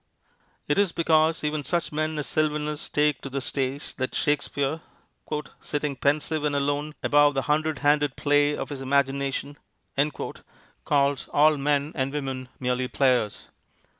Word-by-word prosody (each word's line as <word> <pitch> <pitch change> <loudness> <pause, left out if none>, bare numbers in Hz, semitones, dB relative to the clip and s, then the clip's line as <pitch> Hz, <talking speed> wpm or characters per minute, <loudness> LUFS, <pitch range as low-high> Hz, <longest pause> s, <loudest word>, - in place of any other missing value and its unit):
It 145 - +2
is 200 -3 +3
because 160 -1 +2
even 150 0 -1
such 170 +5 -1
men 155 +1 -1
as 150 - -2
Sylvanus 150 -1 -1
take 150 -2 +1
to 135 - -6
the 140 +1 -2
stage 135 +1 -3
that 130 0 -3
Shakespeare, 145 +1 0 0.8
"sitting 145 -1 -2
pensive 150 +3 0
and 145 -1 0
alone, 145 +2 -1
above 145 0 +4
the 135 - 0
hundred 155 0 +1
handed 145 -1 +3
play 145 0 +2
of - - -4
his 140 -2 -6
imagination," 140 +1 0 1.3
calls 140 -2 +2
all 155 +1 +5
men 145 +1 +1
and 135 -1 -1
women 135 -3 -4
merely 125 0 0
players. 125 -6 +1
145 Hz, 140 wpm, -26 LUFS, 135-150 Hz, 1.3 s, all